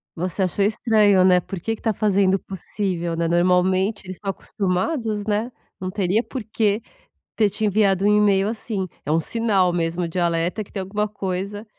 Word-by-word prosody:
Você 180 +3 -3
achou 195 +2 +1
estranho 210 -3 +3
né, 180 -1 +5
por 185 +1 -7
que 225 +6 -2
que - - -20
tá 220 -2 +1
fazendo 195 -2 +2
o - - -2
possível 185 -3 -3
né, 165 0 0
normalmente 185 +4 +2
eles 185 -1 -7
estão 195 -2 -3
acostumados 205 - -2
né, 215 +3 -1 0.3
não 185 0 -4
teria 200 +3 +1
porque 220 -3 -1 0.5
ter 210 -2 +3
te 215 +2 -2
enviado 200 -2 +2
um 210 0 +5
e-mail 200 -1 +3
assim, 215 -3 -3 0.2
é 150 - -1
um 160 - +3
sinal 195 -2 +1
mesmo 170 0 -1
de 175 +2 -3
alerta 170 +4 0
que - - -20
tem 195 - -4
alguma 210 +3 -2
coisa 200 +1 -4
195 Hz, 185 wpm, -22 LUFS, 180-210 Hz, 0.5 s, né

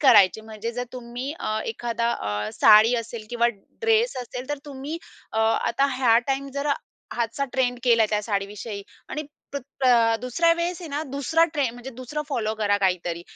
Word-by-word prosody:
करायचे, 220 -7 +6
म्हणजे 220 +1 -6
जर 245 +1 -3
तुम्ही 250 +2 -5
अ, 215 0 -1
एखादा 235 +1 -1
अ, 105 +1 -3
साडी 215 +3 +8
असेल 230 -1 -8
किंवा 235 0 +3 0.3
ड्रेस 455 - +3
असेल, 250 +2 -7
तर 290 -1 -2
तुम्ही 285 +3 -6 0.3
अ, 220 - -1
आता 230 +4 +2
ह्या 235 -3 +5
टाईम 275 0 -1
जर 280 +1 -2 0.5
ह्याचा 235 +3 -1
ट्रेंड 250 -2 +1
केलाय 230 -3 +5
त्या 210 -1 +1
साडीविषयी 205 0 -3 0.3
आणि 305 - -3 0.3
प्र 280 - -1 0.3
अ, 230 -2 +5
दुसऱ्या 335 +8 +3
वेळेस 345 +1 -2
आहे 340 - -7
ना, 290 +1 -2
दुसरा 300 +4 +3
ट्रे 285 -4 +2
म्हणजे 245 +2 -9
दुसरं 255 +4 -5
फॉलो 220 -6 -1
करा 205 -2 +2
काहीतरी. 175 -3 0
240 Hz, 170 wpm, -25 LUFS, 220-275 Hz, 0.5 s, साडी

